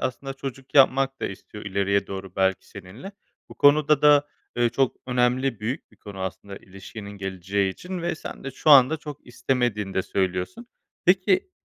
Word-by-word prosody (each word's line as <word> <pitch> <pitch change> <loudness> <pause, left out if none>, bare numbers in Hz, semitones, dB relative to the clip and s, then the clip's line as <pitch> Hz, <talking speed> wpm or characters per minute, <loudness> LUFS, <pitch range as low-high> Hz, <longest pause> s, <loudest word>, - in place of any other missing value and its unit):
aslında 135 +1 -4
çocuk 135 0 -8
yapmak 135 0 +4
da - - -1
istiyor 105 +2 -9
ileriye 100 0 0
doğru 95 0 -8
belki 95 0 0
seninle. 100 - -10 0.4
Bu - - -12
konuda 150 0 +4
da, 145 -1 +5 0.3
ııı, 120 0 +4
çok 130 +2 0
önemli 125 -1 +1
büyük 120 +8 -4
bir - - -22
konu 100 -2 -10
aslında 95 +2 -6
ilişkinin 100 +2 -10
geleceği 95 0 -2
için 180 - -7
ve 170 0 -1
sen 155 - -9
de 135 - -4
şu 145 +4 0
anda 140 +2 +7
çok 150 -2 -10
istemediğini 120 -5 -1
de 95 - +1
söylüyorsun. 95 - -2 0.4
Peki, 195 - +3
120 Hz, 165 wpm, -24 LUFS, 100-140 Hz, 0.4 s, anda